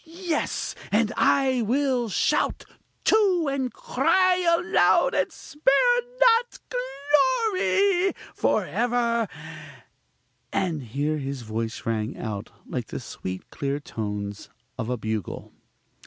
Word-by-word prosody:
Yes! 335 0 -3 0.2
and 220 +2 +2
I 265 -3 +3
will 250 0 +1
shout, - - +1 0.4
too! 380 -7 +3
and 265 -2 -1
cry 370 -6 +2
aloud, 350 +1 +3
and - - +1
spare 315 - +2 0.2
not 485 -1 +4 1.0
glory! 390 0 +2 0.2
for - - +1
ever! 235 -2 0 1.2
(and 170 -6 -1
here 145 +6 -2
his 135 -2 -5
voice 110 +1 -4
rang 110 -1 -2
out 105 -3 -5 0.2
like - - -4
the - - -5
sweet, 95 0 -7
clear 140 0 -2
tones 105 -6 -5 0.3
of 115 -2 -4
a 125 - -1
bugle). 110 -3 -4
235 Hz, 110 wpm, -25 LUFS, -, 1.2 s, not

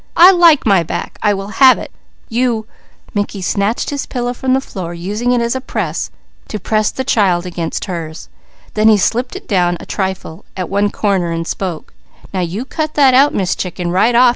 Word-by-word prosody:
I 360 +3 +9
like 340 -5 +5
my 195 -5 +4
back! 165 - -5
I 205 -1 +2
will 195 +6 -7
have 260 -1 +8
it! - - -8 0.4
You 235 -2 0 0.2
" - - -28
Mickey 205 -1 -2
snatched 200 +7 -1
his 285 -1 -3
pillow 245 -1 -2
from 260 +1 0
the - - +2
floor, 180 -9 -6
using 210 +8 -2
it 235 -1 +2
to 260 - -1 1.0
press 215 +2 0
the 260 - -3
child 190 -8 +2
against 170 -2 -4
hers. 165 -4 -6 0.5
Then 215 0 +3
he 215 -1 +6
slipped 240 +5 0
it - - -9
down 175 -3 +1
a - - -10
trifle 190 -4 -4
at 185 - -3
one 200 +1 +1
corner 195 -5 0
and 165 0 -3
spoke: 175 -2 -5 0.4
"Now 190 - -1
you 185 +7 -3
cut 310 +2 -3
that 275 -3 +5
out, 275 +3 +5
Miss 185 -2 +1
Chicken, 180 -1 -4
right 215 +7 +3
off!" 245 +1 +7
205 Hz, 190 wpm, -16 LUFS, 180-245 Hz, 1.0 s, I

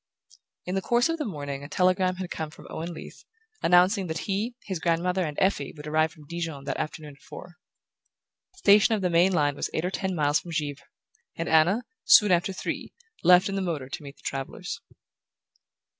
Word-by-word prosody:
In 180 - -3
the 195 - 0
course 240 - +2
of 330 0 -1
the 300 - -1
morning 145 - -5
a 145 - -9
telegram 185 +1 +2
had 185 -1 -6
come 160 -1 -4
from 155 - -14
Owen 165 +2 -5
Leath, 160 - -10 0.4
announcing 185 +3 +4
that 160 0 -3
he, 210 +5 -2
his 190 -4 -4
grandmother 180 +3 +1
and 150 -3 -4
Effie 185 -7 +1
would 150 - -9
arrive 155 +1 +1
from 150 -2 -16
Dijon 165 -3 -5
that 140 - -3
afternoon 150 -2 -6
at - - -27
four. 175 -1 -11 1.0
The - - -27
station 210 - +5
of 200 - -3
the 180 - +1
main 175 +3 +4
line 145 -5 +1
was - - -3
eight 160 - 0
or 180 - -1
ten 190 -1 -2
miles 145 -1 +2
from 170 - -9
Givre, 145 -3 -3 0.5
and 165 - -3
Anna, 170 +9 +4 0.2
soon 210 - +7
after 175 +2 +2
three, 190 - -5 0.3
left 180 +1 +6
in 195 - -3
the 195 - -1
motor 155 -8 -3
to - - -6
meet 140 -1 -10
the - - -25
travellers. 135 -1 -5
175 Hz, 205 wpm, -26 LUFS, 155-190 Hz, 1.0 s, soon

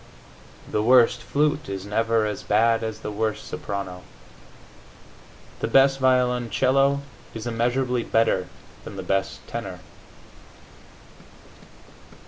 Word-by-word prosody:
The 105 - -1
worst 120 +1 +5
flute 150 -1 0
is 95 -1 -5
never 115 +1 +1
as 105 -2 -3
bad 115 +2 +2
as 110 0 -5
the - - -5
worst 110 +1 -2
soprano. 95 -2 -5 1.6
The - - -1
best 135 0 +4
violoncello 130 +2 +2 0.3
is 115 0 -6
immeasurably 120 +2 0
better 115 -6 +1 0.4
than - - -9
the - - -6
best 95 0 -2
tenor. - - -6
115 Hz, 105 wpm, -24 LUFS, 105-130 Hz, 1.6 s, worst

